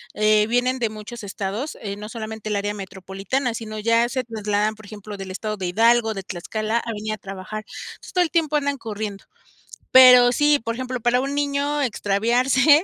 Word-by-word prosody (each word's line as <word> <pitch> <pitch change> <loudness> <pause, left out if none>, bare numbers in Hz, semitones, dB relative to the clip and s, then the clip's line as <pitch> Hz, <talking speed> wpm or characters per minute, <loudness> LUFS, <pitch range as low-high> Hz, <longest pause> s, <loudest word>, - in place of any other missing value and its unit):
eh, 215 0 +3
vienen 250 +2 +1
de 230 -3 0
muchos 215 +1 -9
estados, 205 +7 -4
eh, 200 -2 -4
no 210 +1 -8
solamente 220 -2 -6
el 210 - -1
área 205 +1 -1
metropolitana, 195 +6 -3
sino 215 -1 -6
ya 230 +2 +2
se 255 0 -2
trasladan, 215 -2 -1
por 215 -1 -15
ejemplo, 210 0 -9
del 195 -1 -7
estado 215 +3 -4
de 185 -2 -3
Hidalgo, 225 +3 +3
de 195 - -5
Tlaxcala 215 +5 -3
a 235 - -5
venir 215 0 -4
a - - -5
trabajar. 195 +2 -7 0.4
Pues - - -12
todo 360 - +4
el 330 - -3
tiempo 315 -3 +1
andan 285 -1 0
corriendo. 210 -4 -6 0.7
Pero 250 -1 +9
sí, 295 +3 +3
por 230 - -2
ejemplo, 255 0 -4
para 240 +2 +2
un 275 +1 -3
niño, 285 0 0
extraviarse 250 - +3
220 Hz, 190 wpm, -22 LUFS, 210-255 Hz, 0.7 s, Pero